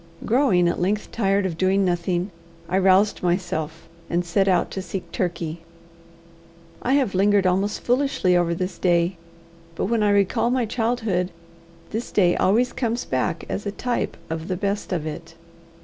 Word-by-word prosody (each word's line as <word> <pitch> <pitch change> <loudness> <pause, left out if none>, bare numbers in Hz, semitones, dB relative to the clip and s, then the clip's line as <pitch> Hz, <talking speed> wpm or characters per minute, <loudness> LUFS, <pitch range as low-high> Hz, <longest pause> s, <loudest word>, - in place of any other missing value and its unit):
Growing 225 -8 +3
at 170 - -1
length 200 +4 -1
tired 200 -2 +1
of 165 -4 -3
doing 190 +1 +3
nothing, 175 +1 -1 0.4
I 185 +2 +1
roused 195 +2 +4
myself, 175 -3 -2 0.2
and 175 +1 0
set 195 +3 +1
out 180 -2 +2
to 190 - -4
seek 185 0 -6
Turkey. 170 -3 -3 1.2
I 255 - +1
have 270 -8 +2
lingered 200 +1 +3
almost 190 +3 +1
foolishly 245 -8 +2
over 170 -1 +2
this 185 +2 -4
day. 175 0 +2 0.6
But - - -1
when 225 +2 +1
I 210 - +3
recall 200 +3 +2
my 250 -1 +1
childhood, 225 -5 -1 0.6
this 225 +3 -4
day 180 -3 +3
always 235 +6 +2
comes 235 -1 -2
back 155 +6 -1
as 205 - -4
a - - -1
type 245 +4 -2
of 160 +1 -4
the 185 - -2
best 200 +1 -2
of 165 -4 -1
it. 160 +2 -7
190 Hz, 165 wpm, -23 LUFS, 175-210 Hz, 1.2 s, roused